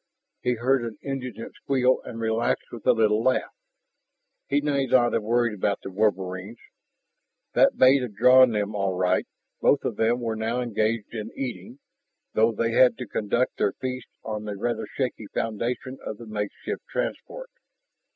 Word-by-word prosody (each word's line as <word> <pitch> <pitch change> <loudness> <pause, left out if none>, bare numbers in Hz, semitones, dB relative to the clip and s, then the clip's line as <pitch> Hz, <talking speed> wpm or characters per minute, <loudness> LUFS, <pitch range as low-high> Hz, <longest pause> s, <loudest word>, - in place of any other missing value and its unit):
He 125 - +1
heard 130 +3 +2
an 115 -2 -6
indignant 130 -4 -5
squeal 130 -1 +1
and 115 - -8
relaxed 110 0 -1
with 120 -3 -8
a - - +8
little 110 -1 +2
laugh. 130 +2 +1 0.9
He 140 - +2
need 140 -3 0
not 120 -1 +4
have 115 - +1
worried 120 +1 +1
about 100 0 -1
the 95 - -6
wolverines; 95 +1 -1 1.0
that - - +4
bait 130 +1 +6
had 120 -5 -5
drawn 125 +2 +7
them 105 -2 -1
all 100 -2 -1
right. 90 0 +1 0.3
Both - - +3
of - - -2
them 115 +2 +2
were 115 -2 -2
now 110 +3 -1
engaged 115 -2 -1
in 110 -2 -5
eating, 120 -2 -5 0.6
though 110 +1 +4
they 115 +1 -1
had 125 +2 +5
to 125 - -5
conduct 110 +3 -1
their 100 - +1
feast 130 -1 -5 0.2
on 105 -1 -4
the 105 -1 -5
rather 120 +4 -2
shaky 125 -5 -3
foundation 120 +4 -3
of 110 - -5
the 120 - -10
makeshift 105 -2 -4
transport. - - -4
115 Hz, 165 wpm, -25 LUFS, 105-125 Hz, 1.0 s, a